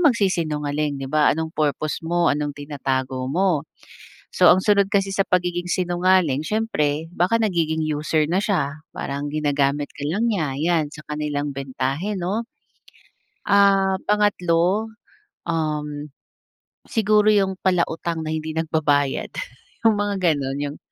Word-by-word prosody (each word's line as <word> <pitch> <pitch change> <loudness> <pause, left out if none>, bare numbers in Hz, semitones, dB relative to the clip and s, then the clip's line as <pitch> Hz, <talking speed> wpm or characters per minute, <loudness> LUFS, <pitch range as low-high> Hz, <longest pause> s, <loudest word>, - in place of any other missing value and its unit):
magsisinungaling, 155 - +1
'di - - -4
ba 155 +1 +3
anong 160 +1 -3
purpose 150 0 -1
mo, 170 +1 +2
anong 145 0 -2
tinatago 130 -3 -3
mo. 170 -1 +1 0.7
So - - +5
ang 185 - +3
sunod 200 -2 +4
kasi 195 -1 +2
sa 195 - 0
pagiging 175 -1 0
sinungaling 175 -5 +2
siyempre 165 -8 -1
baka 180 +6 +2
nagiging 165 -6 0
user 155 0 0
na 180 +3 +1
siya, 155 -8 -1
parang 140 +1 -4
ginagamit 145 -1 0
ka 145 - -10
lang 215 +8 0
niya 155 -9 -1
yan 165 -1 +1
sa 155 - -10
kanilang 150 -1 -2
bentahe 135 +8 -3
'no? 200 +6 -2 1.0
Ah, 195 -1 +4
pangatlo, 205 0 +1 0.5
um, 150 -3 -2 0.8
siguro 215 -1 +2
yung 195 -3 +3
palautang 170 -3 0
na 155 - -3
hindi 160 0 -4
nagbabayad 150 -3 0 0.6
yung 225 -2 +6
mga 205 -1 -1 0.2
ganun, 145 +1 -3
160 Hz, 125 wpm, -22 LUFS, 145-190 Hz, 1.0 s, yung